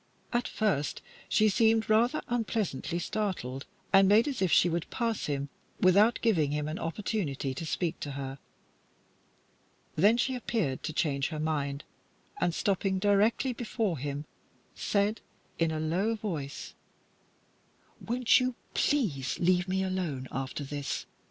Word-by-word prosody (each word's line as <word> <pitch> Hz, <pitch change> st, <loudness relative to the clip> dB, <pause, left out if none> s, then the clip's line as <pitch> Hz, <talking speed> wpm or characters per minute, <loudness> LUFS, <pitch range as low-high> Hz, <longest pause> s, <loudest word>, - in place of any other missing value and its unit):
At 240 Hz, 0 st, +1 dB
first 190 Hz, -10 st, -1 dB, 0.3 s
she 215 Hz, -, +4 dB
seemed 220 Hz, +1 st, +3 dB
rather 235 Hz, +7 st, +3 dB
unpleasantly 220 Hz, -, -1 dB
startled, 175 Hz, -, -3 dB, 0.3 s
and 195 Hz, 0 st, +7 dB
made 215 Hz, +6 st, +5 dB
as 275 Hz, -7 st, -3 dB
if 185 Hz, -3 st, +2 dB
she -, -, +6 dB
would 170 Hz, -1 st, -2 dB
pass 230 Hz, -3 st, -1 dB
him 140 Hz, -1 st, -2 dB, 0.3 s
without 200 Hz, +5 st, +5 dB
giving 170 Hz, -11 st, +3 dB
him 150 Hz, 0 st, -1 dB
an 155 Hz, +2 st, -4 dB
opportunity 165 Hz, -7 st, -2 dB
to 160 Hz, +5 st, -5 dB
speak 170 Hz, 0 st, -1 dB
to 145 Hz, -, -5 dB
her. 135 Hz, 0 st, -5 dB, 1.6 s
Then 205 Hz, +8 st, +5 dB
she 260 Hz, +2 st, +1 dB
appeared 220 Hz, -, -1 dB
to -, -, -3 dB
change 140 Hz, -3 st, 0 dB
her 155 Hz, -2 st, -5 dB
mind, 145 Hz, -2 st, -1 dB, 0.6 s
and, 170 Hz, -, +1 dB
stopping 195 Hz, -1 st, +1 dB
directly 205 Hz, +6 st, +2 dB
before 220 Hz, -, -2 dB
him, 145 Hz, +2 st, -4 dB, 0.5 s
said, 205 Hz, +2 st, 0 dB, 0.4 s
in 165 Hz, -1 st, +3 dB
a 160 Hz, -1 st, -2 dB
low 180 Hz, +8 st, 0 dB
voice 160 Hz, -10 st, -5 dB, 1.3 s
"Won't 240 Hz, +1 st, +4 dB
you 255 Hz, -1 st, -1 dB, 0.2 s
please 165 Hz, -, +1 dB
leave 180 Hz, +1 st, +2 dB
me 190 Hz, +1 st, 0 dB
alone, 175 Hz, -9 st, -2 dB
after 135 Hz, +2 st, -4 dB
this? 145 Hz, 0 st, -4 dB
185 Hz, 140 wpm, -30 LUFS, 145-220 Hz, 1.6 s, and